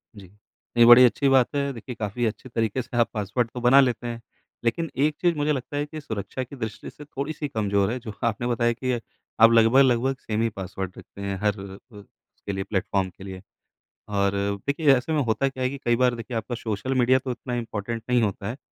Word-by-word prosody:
जी। 100 -3 -12 0.5
नहीं 120 - +8
बड़ी 120 +1 +10
अच्छी 140 +3 +2
बात 130 -2 +5
है 140 0 0
देखिए 120 +1 -8
काफ़ी 110 +3 -2
अच्छे 110 +4 -4
तरीके 115 +1 -1
से 120 - -7
आप 120 - +3
पासवर्ड 110 +3 -1
तो 125 - -5
बना 125 +3 +6
लेते 120 -2 0
हैं 115 0 -5 0.4
लेकिन 160 +8 0 0.2
एक 150 -1 0
चीज़ 175 -2 +3
मुझे 145 +1 +1
लगता 140 +1 -3
है 145 - 0
कि 155 +1 -8
सुरक्षा 110 +2 -4
की 125 - -11
दृष्टि 110 -5 -6
से 150 - -13
थोड़ी-सी 145 +1 -4
कमजोर 100 -3 0
है 125 - -3
जो 115 -4 -8
आपने 115 +1 0
बताया 120 0 +1
कि 130 +2 -3
अ, 120 - 0 0.4
आप 115 +1 +8
लगभग-लगभग 125 +3 +4
सेम 110 0 -2
ही 115 - +2
पासवर्ड 95 -2 -6
रखते 100 - -12
हैं 100 -1 -3
हर 105 -1 0
अ - - -7
अ, 105 +3 -16
उसके 100 0 -11
लिए 95 0 -2
प्लेटफ़ॉर्म 95 -1 -1
के 95 - -11
लिए 95 -1 -8 0.8
और 100 0 +2 0.4
देखिए 140 0 +3
ऐसे 125 +5 -3
में 150 - +2
होता 120 +4 +1
क्या 130 -1 -5
है 130 - +2
कि 140 - -6
कई 120 0 +3
बार 125 -1 +3
देखिए 115 +1 -5
आपका 115 +2 -4
सोशल 115 +3 -3
मीडिया 130 +2 +4
तो 130 -1 -4
इतना 125 0 -6
इम्पॉर्टेंट 115 -1 -4
नहीं 125 -1 +3
होता 100 -1 -2
है 125 - -5
120 Hz, 230 wpm, -25 LUFS, 105-130 Hz, 0.8 s, बड़ी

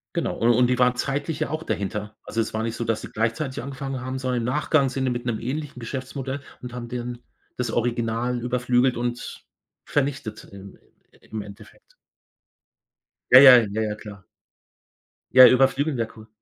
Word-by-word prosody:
Genau, - - -2
u - - +1
und 120 +1 +4
die 125 0 0
waren 125 0 +4
zeitlich 145 +4 -3
ja 155 - 0
auch 155 +1 -4
dahinter. 105 - -4
Also, 115 - -4
es 115 - -1
war 110 - -2
nicht 115 0 -3
so, 120 - -3
dass 115 -1 -1
sie - - -8
gleichzeitig 115 +5 -2
angefangen 135 0 -5
haben, 130 +1 -4
sondern 130 -1 -2
im 115 - -3
Nachgang 140 +2 +2
sind 130 0 -3
die 130 - +1
mit 120 0 -4
'nem 115 -3 -2
ähnlichen 130 +1 -5
Geschäftsmodell 130 +2 -5 0.2
und 125 -1 -8
haben 120 -1 -6
dann 120 0 -5 0.4
das 125 -2 -2
Original 120 +1 -1
überflügelt 125 +1 +1
und 120 0 -4 0.4
vernichtet 135 -5 -2
im 100 0 -12 0.5
im 110 - -4
Endeffekt. 105 - -14 1.4
Ja, 130 - +10
ja, 130 -2 +10
ja, 110 +2 -2
ja, 105 -1 -2
klar. 100 -3 -11 1.1
Ja, 130 0 +11
überflügeln 135 +2 +2
wäre 115 -1 -1
cool. 110 0 -13
125 Hz, 175 wpm, -24 LUFS, 115-130 Hz, 1.4 s, Ja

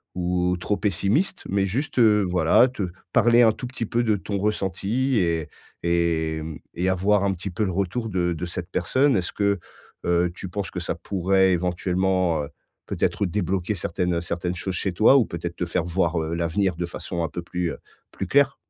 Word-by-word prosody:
ou 90 0 0
trop 105 +4 0
pessimiste, 110 - 0
mais 100 0 +1
juste, 130 +8 -2
heu, 105 -3 +5
voilà, 90 +7 +5
te 100 -8 -3 0.2
parler 120 0 +5
un 110 - +6
tout 120 - -7
petit 120 -2 -4
peu 120 +3 0
de 110 -2 +2
ton 100 +1 -3
ressenti 105 +5 0
et 85 -3 0 0.4
et 85 -2 +1
hem 80 0 -6 0.2
et 90 +2 0
avoir 100 +2 +2
un 100 - +2
petit 95 +2 -5
peu 90 +5 -1
le 95 - -1
retour 100 +5 -2
de 90 -3 0
de 85 +2 -4
cette 85 +1 -6
personne. 130 +10 +2
Est-ce 90 -2 -2
que, 100 -2 +1 0.5
heu, 85 0 +2
tu 95 - -7
penses 95 -1 -4
que - - -4
ça - - -2
pourrait 95 0 +2
éventuellement, 90 -1 +1
heu, 70 - -7 0.4
peut-être 100 - 0
débloquer 95 0 -1
certaines 90 -1 -1
certaines 90 +1 -3
choses 95 +1 -4
chez 95 +2 -1
toi 110 +8 +6
ou 125 - +4
peut-être 85 -1 -5
te 90 - -1
faire 85 0 -1
voir, 85 -2 0
heu, 80 +1 -3
l'avenir 85 +2 0
de 85 - -1
façon 85 0 -4
un 80 - -2
peu 85 - -5
plus, 85 0 -2
heu, - - -7 0.3
plus 95 - -5
clair? 140 +4 +3
95 Hz, 200 wpm, -24 LUFS, 85-105 Hz, 0.5 s, un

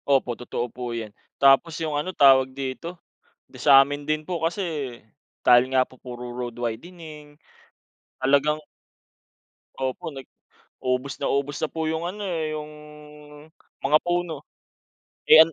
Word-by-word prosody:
0po, 135 -3 +2
totoo 120 0 -3
po 125 -1 -5
yan. 110 -3 -5 0.3
Tapos 140 +4 +5
yung 155 -2 -1
ano, 180 +6 -2
tawag 135 -3 +6
dito? 140 +6 -5 0.6
Sa'min 145 +1 +5
din 155 0 0
po 175 0 -3
kasi, 160 - -2 0.5
dahil 125 +1 +6
nga 130 -1 +4
po 130 - -19
puro 125 -1 -8
road 120 -1 -5
widening 150 +5 -7 0.9
talagang 140 +3 +3 1.2
Opo, 130 +4 -3
nag 135 -2 -9 0.6
ubos 130 +2 -1
na 140 - -1
ubos 140 +1 -1
na 155 - +1
po 160 -1 -3
yung 160 +1 -1
ano 200 +4 -5
eh, 165 -4 -2
yung 150 0 -6 1.1
mga 150 +2 +5
puno. 175 -4 -2 0.9
Eh 160 - +10
an 165 - -8
140 Hz, 135 wpm, -24 LUFS, 130-160 Hz, 1.2 s, Eh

